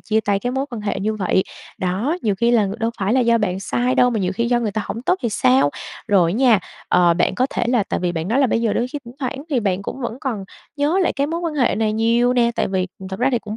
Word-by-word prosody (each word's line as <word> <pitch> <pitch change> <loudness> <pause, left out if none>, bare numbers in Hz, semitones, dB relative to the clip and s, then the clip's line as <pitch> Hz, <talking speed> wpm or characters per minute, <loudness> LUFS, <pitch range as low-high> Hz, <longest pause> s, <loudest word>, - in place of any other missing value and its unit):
chia 220 0 0
tay 205 -2 0
cái 245 +5 -3
mối 265 +2 -1
quan 235 -3 -5
hệ 205 -1 -2
như 215 +2 -1
vậy. 190 -2 +1 0.4
Đó, 195 - -1
nhiều 210 -3 +1
khi 235 +4 +1
là 230 -3 +4
ng 200 +4 -5
đâu 230 -1 0
phải 200 +3 0
là 260 - +3
do 235 -1 +3
bạn 190 -3 -1
sai 245 +5 0
đâu 250 -1 +4
mà 225 - -1
nhiều 185 0 0
khi 235 - 0
do 240 -1 +2
người 220 - -1
ta 215 - -2
hổng 230 - -5
tốt 360 - +2
thì 235 - +1
sao? 135 - +3 0.4
Rồi 180 -5 +3
á - - -2
nha, 245 -5 +5 0.3
ờ, 175 -1 +4
bạn 175 - +1
có 255 - +1
thể - - -1
là 245 -3 +3
tại - - -3
vì 175 -1 -1
bạn 165 +1 -3
nói 235 +5 +1
là 275 - +4
bây 230 - 0
giờ 225 -3 +1
đôi 240 - 0
khi 290 - -5
thỉnh 235 +1 -11
thoảng 275 0 -4
thì 255 -5 +1
bạn 195 -2 -1
cũng 265 - -6
vẫn 240 -1 -4
còn 225 -8 -3 0.3
nhớ 300 +6 +1
lại 350 - +1
cái 280 0 -1
mối 335 +3 -3
quan 335 -3 -3
hệ 265 -5 +2
này 215 -1 0
nhiều 230 +3 +2
nè, 240 -1 +3
tại - - +1
vì, 190 -1 0
ừm, 190 - -8
thực 190 0 -6
ra 255 - +3
thì 245 - +2
cũng 215 -1 -7
230 Hz, 310 wpm, -20 LUFS, 195-250 Hz, 0.4 s, nha